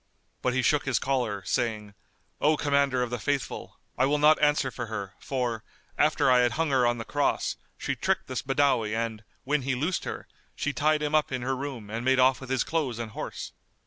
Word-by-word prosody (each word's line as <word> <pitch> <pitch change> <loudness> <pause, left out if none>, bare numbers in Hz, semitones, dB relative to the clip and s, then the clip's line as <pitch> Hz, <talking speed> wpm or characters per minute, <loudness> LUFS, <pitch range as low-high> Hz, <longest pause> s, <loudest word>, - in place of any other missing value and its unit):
But 125 0 0
he 130 - +1
shook 145 +4 +2
his 135 -4 +1
collar, 120 -7 -1
saying, 110 -4 -1 0.5
"O 150 +1 +3
Commander 140 -3 +2
of 120 - -4
the 120 - -2
Faithful, 140 +3 -3 0.2
I 130 - +4
will 150 +2 +2
not 150 +1 +5
answer 145 -3 +3
for 120 -1 -5
her; 100 -3 -5
for, 120 -5 -2 0.3
after 150 -3 +3
I 125 - +6
had 120 -1 +3
hung 165 -2 0
her 130 -2 +4
on 120 0 +1
the 115 - -5
cross, 145 -1 0 0.2
she - - -2
tricked - - 0
this - - -3
Badawi 130 -6 +1
and, 110 -1 -3 0.2
when 145 +1 +1
he 130 0 -1
loosed 160 +8 -1
her, - - -5 0.3
she 145 - -2
tied 150 +3 +2
him 150 0 -1
up 155 -2 +2
in 130 -2 -2
her 135 +1 0
room 130 -6 -6
and 115 +2 -3
made 130 +1 +3
off 130 +1 +4
with 130 - -9
his 130 -2 +1
clothes 150 -8 -1
and 115 -2 -5
horse." - - -6
130 Hz, 215 wpm, -27 LUFS, 120-145 Hz, 0.5 s, I